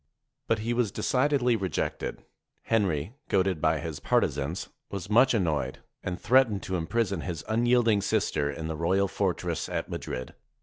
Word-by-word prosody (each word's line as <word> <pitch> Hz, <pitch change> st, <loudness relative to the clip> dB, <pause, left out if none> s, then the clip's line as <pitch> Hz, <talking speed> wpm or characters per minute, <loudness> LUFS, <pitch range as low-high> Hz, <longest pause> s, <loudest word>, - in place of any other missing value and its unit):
But 115 Hz, -, +2 dB
he 120 Hz, -, +1 dB
was 120 Hz, -4 st, +1 dB
decidedly 130 Hz, -2 st, +2 dB
rejected. 95 Hz, -4 st, -3 dB, 0.4 s
Henry, 95 Hz, -5 st, 0 dB, 0.2 s
goaded 95 Hz, -4 st, +1 dB
by 80 Hz, -1 st, +3 dB
his 80 Hz, -1 st, -5 dB
partisans, 80 Hz, +7 st, 0 dB, 0.2 s
was 100 Hz, 0 st, -6 dB
much 120 Hz, +3 st, +5 dB
annoyed, 85 Hz, -8 st, 0 dB, 0.2 s
and 90 Hz, 0 st, -4 dB
threatened 120 Hz, -5 st, +3 dB
to 95 Hz, -, -2 dB
im 80 Hz, -2 st, -2 dB
prison 100 Hz, -7 st, 0 dB
his 85 Hz, -4 st, -5 dB
unyielding 115 Hz, -1 st, +3 dB
sister 95 Hz, -9 st, 0 dB
in 80 Hz, +3 st, -5 dB
the 80 Hz, -, -3 dB
royal 95 Hz, +5 st, +2 dB
fortress 90 Hz, -3 st, -1 dB
at -, -, -3 dB
Mad -, -, -5 dB
rid. 65 Hz, 0 st, -5 dB
95 Hz, 160 wpm, -28 LUFS, 80-115 Hz, 0.4 s, much